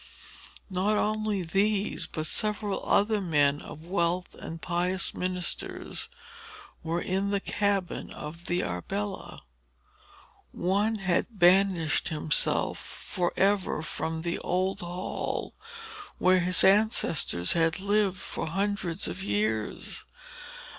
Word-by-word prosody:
Not 195 +3 +1
only 215 -2 0
these, 200 +4 0
but 155 -1 -4
several 210 +2 +1
other 210 +1 +3
men 145 -5 +3
of 155 +2 -10
wealth 175 0 0
and 165 - -8
pious 180 +2 +1
ministers, 180 -1 -2 0.7
were 165 +1 -1
in 190 +3 -1
the 200 0 +1
cabin 200 -2 -1
of 170 +3 -8
the 175 +1 0
Arbella. 195 - -4 1.1
One 200 +5 +1
had 195 +3 -1
banished 180 -3 +4
himself 155 0 +1
for 180 -3 -3
ever 195 -5 +2
from 160 0 -3
the 170 0 -2
old 185 +1 -1
hall 175 +1 -4 0.6
where 185 0 +4
his 180 0 +2
ancestors 190 - +3
had 165 0 +2
lived 200 -1 +1
for - - -4
hundreds 195 0 -1
of 90 +2 -5
years. 105 +2 -1
185 Hz, 110 wpm, -28 LUFS, 165-200 Hz, 1.1 s, banished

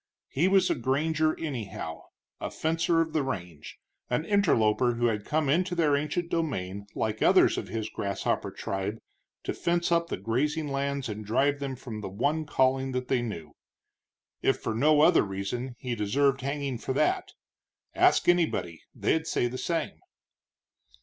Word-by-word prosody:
He 160 +7 +2
was 190 -1 +4
a - - +4
granger, 155 +5 0
anyhow, 110 - -5 0.3
a - - -3
fencer 165 +1 +1
of 160 -1 -2
the 155 - +2
range, 90 - -6 0.3
an 125 +6 0
interloper 125 - +3
who 120 +1 0
had 105 -3 0
come 155 -1 0
into 175 +5 +1
their 155 -4 +3
ancient 150 +4 -2
domain 100 - -2
like 110 0 -2
others - - +5
of - - -4
his 110 -2 -3
grasshopper 100 -1 -2
tribe 100 +2 -4 0.5
to - - -2
fence 175 0 0
up 170 0 +2
the - - -3
grazing 150 +6 -1
lands 140 -1 -2
and 105 -1 -5
drive 140 +7 +1
them 135 -2 -3
from 115 -4 -7
the 100 - -5
one 145 +10 -1
calling 130 -1 +1
that 125 0 -3
they 130 -2 +2
knew. 85 -11 -6 0.9
If - - +2
for 110 - -3
no 150 +6 +4
other 155 - +6
reason, 105 +6 -4
he 125 -1 -4
deserved 135 +6 +1
hanging 140 -2 -3
for 130 - -3
that. 375 - 0 0.6
Ask - - +4
anybody; 160 - +1
they'd 160 0 0
say - - +1
the 125 +1 -3
same. 165 -1 -2
135 Hz, 165 wpm, -28 LUFS, 110-160 Hz, 0.9 s, other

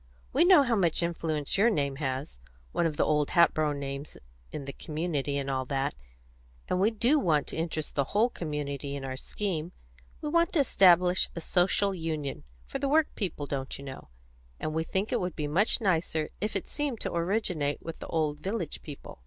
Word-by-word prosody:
We 315 +6 +5
know 360 -5 +8
how 240 -3 +1
much 175 -4 +2
influence 160 -2 -1
your 225 +4 +6
name 140 -9 0
has 130 - -3 0.3
one 170 - +2
of 155 - -4
the - - +3
old 150 -1 +2
Hatboro' 155 -3 +4
names 140 0 -5 0.3
in 140 - -5
the 140 - -6
community, 150 -3 -2
and 140 -1 -2
all 135 -1 0
that; 135 0 -1 0.7
and 180 - 0
we 205 - +5
do 235 +7 +3
want 155 - +2
to - - -5
interest 160 -1 -3
the 140 - +1
whole 220 - +2
community 145 - -4
in 135 -1 -5
our 130 0 -4
scheme. 175 +3 -3 0.5
We 300 - -3
want 335 +2 +2
to 335 - +3
establish 180 -6 +5
a - - -3
Social 195 +4 +2
Union 155 - -3 0.2
for - - -5
the 275 - 0
work 310 +1 +3
people, 175 -8 -3
don't 135 -1 -4
you 140 - -10
know, 130 -1 -8 0.5
and 155 - -3
we 160 +1 0
think 190 +5 -2
it - - +2
would 180 0 -3
be 150 - -2
much 190 - +3
nicer 165 -6 0
if 210 +1 -2
it 195 - -2
seemed 285 -6 -2
to - - -2
originate 170 -5 0
with 165 -1 -6
the - - -7
old 155 -2 0
village 190 -1 -3
people." 145 - -10
160 Hz, 200 wpm, -29 LUFS, 145-195 Hz, 0.7 s, know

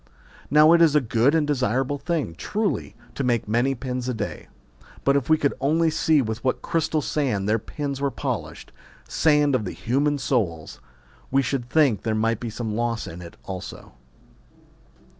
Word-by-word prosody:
Now 150 +3 +6
it 170 - +5
is 160 -3 +5
a - - +7
good 125 +3 +2
and 160 -2 +2
desirable 135 0 0
thing, 160 - -2
truly, 210 - -2 0.2
to 140 - -3
make 120 -4 0
many 120 +5 +1
pins 125 0 -4
a 125 - -2
day; 105 -2 -5 0.6
but 140 - +3
if 140 -1 0
we 155 - +5
could 140 -2 +1
only 160 +4 +2
see 155 -2 +2
with 110 0 -4
what 130 - -1
crystal 160 -2 0
sand 120 -10 -1
their 110 +2 +2
points 140 +3 -5
were 140 - +1
polished, - - -5 0.4
sand 150 -2 +3
of 110 -6 0
human 140 +9 0
souls, 95 - -2 0.5
we 135 +1 +2
should 125 -2 -3
think 135 - +3
there 110 -1 -1
might 115 0 0
be 120 - -4
some 110 -1 -4
loss 115 0 -1
in 85 +2 -8
it 85 -1 -11
also. 95 -1 -8
130 Hz, 175 wpm, -24 LUFS, 115-150 Hz, 0.6 s, a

